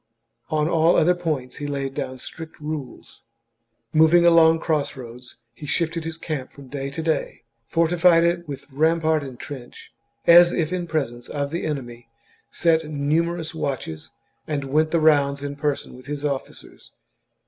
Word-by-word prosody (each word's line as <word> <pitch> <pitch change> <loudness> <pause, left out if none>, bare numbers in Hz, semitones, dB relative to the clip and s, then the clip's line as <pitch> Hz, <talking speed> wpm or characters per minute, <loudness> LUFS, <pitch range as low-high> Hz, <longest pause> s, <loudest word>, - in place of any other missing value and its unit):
On 155 -1 +1
all 165 0 +3
other 175 +3 +4
points 155 -8 -3
he 145 - -4
laid 140 -1 -3
down 130 -2 -4
strict 160 +6 -10
rules. 150 -3 -7 0.7
Moving 160 +2 +5
along 165 -1 +6
cross 155 -3 -1
roads, 125 0 -10 0.2
he 150 +5 -10
shifted 165 +1 -1
his 165 0 -4
camp 150 -6 -5
from 140 -2 -14
day 140 0 -4
to 160 +4 -5
day, 160 -6 -2 0.2
fortified 170 0 +4
it 170 0 0
with 140 -2 -7
rampart 160 +1 +2
and 130 -3 -9
trench, 130 -4 -10 0.3
as 175 +1 +8
if 165 +1 -1
in 175 -1 -2
presence 135 -7 -3
of 140 -1 -3
the 170 - -3
enemy, 120 -5 -6 0.4
set 160 -2 +1
numerous 160 +3 -1
watches, 130 - -4 0.4
and 145 -2 -2
went 155 +4 +1
the 170 - +2
rounds 140 -3 +3
in 145 0 -4
person 145 -1 -2
with 130 +1 -14
his 145 0 -4
officers. 140 -2 -6
155 Hz, 160 wpm, -23 LUFS, 140-165 Hz, 0.7 s, as